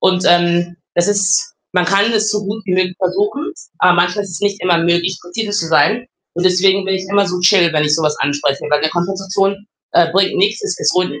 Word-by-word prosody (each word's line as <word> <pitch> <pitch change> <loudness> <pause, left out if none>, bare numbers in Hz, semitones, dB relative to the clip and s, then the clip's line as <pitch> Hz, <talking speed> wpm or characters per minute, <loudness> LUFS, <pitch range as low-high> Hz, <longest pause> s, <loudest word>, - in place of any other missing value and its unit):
Und, 185 -1 +1
ähm, 175 0 +2 0.2
das 175 - +2
ist 200 0 +1 0.2
man 180 -1 +2
kann 200 +5 +2
es 215 -1 +1
so 210 -1 -2
gut 215 +2 -5
wie 185 - -3
möglich 185 0 0
versuchen, 205 - -2 0.3
aber 180 0 +4
manchmal 180 +4 +1
ist 195 - -10
es 175 - -7
nicht 205 0 -1
immer 175 -2 +2
möglich, 175 +2 0
präzise 205 +5 -5
zu 205 -5 -1
sein 220 +9 +2 0.3
und 175 +1 -3
deswegen 190 +2 +3
bin 190 - 0
ich 190 0 -4
immer 200 0 +2
so 180 0 -3
chill, 180 -2 +4
wenn 150 0 +2
ich 150 0 +2
so 160 - -1
was 150 -1 0
anspreche, 145 -1 -1
weil 150 0 +2
'ne 155 - +1
Konfrontation, 195 +3 -2 0.3
äh, 170 -1 +3
bringt 195 0 +2
nichts. 205 +3 +1
Es 185 - -3
es - - +1
ruin 180 -5 -1
185 Hz, 230 wpm, -16 LUFS, 175-200 Hz, 0.3 s, aber